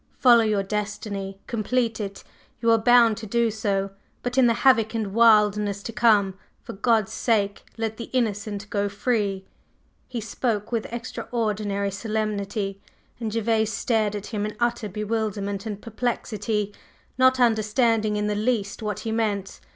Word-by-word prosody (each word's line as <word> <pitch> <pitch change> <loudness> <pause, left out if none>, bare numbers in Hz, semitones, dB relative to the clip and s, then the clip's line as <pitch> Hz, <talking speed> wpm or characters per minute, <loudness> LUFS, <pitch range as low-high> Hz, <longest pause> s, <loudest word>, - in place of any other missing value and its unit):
Follow 240 -3 +6
your 210 -2 +1
destiny, 200 -1 -4
complete 230 0 -1
it, 200 -2 -5 0.4
you 230 -1 +3
are 225 - +5
bound 235 -1 +5
to 225 - -7
do 235 +2 +1
so, 200 -2 -1 0.3
but 245 +1 -2
in 260 -2 +5
the 230 - +3
havoc 230 -4 +5
and 210 -4 -2
wildness 210 -3 +4
to 230 - -6
come, 210 -3 +4 0.3
for - - -7
God's 220 0 +1
sake, 205 -4 0
let 220 -1 -3
the 235 - -5
innocent 210 -4 -2
go 205 -1 0
free!" 200 -3 -1 0.6
He 245 -2 -4
spoke 220 -1 -2
with 230 -2 -2
extraordinary 210 -4 -2
solemnity, 205 -1 -3 0.4
and 225 -2 -3
Gervase 225 0 +1
stared 215 -1 0
at 205 -1 -5
him 210 -3 -3
in 210 0 -4
utter 235 -2 0
bewilderment 210 0 -2
and 205 -2 -4
perplexity, 215 -2 -2 0.5
not 260 0 +5
understanding 220 -1 +2
in 210 0 0
the 210 - 0
least 210 -2 -1
what 210 -3 -3
he 225 - -3
meant. 210 -4 -1
215 Hz, 150 wpm, -24 LUFS, 205-230 Hz, 0.6 s, Follow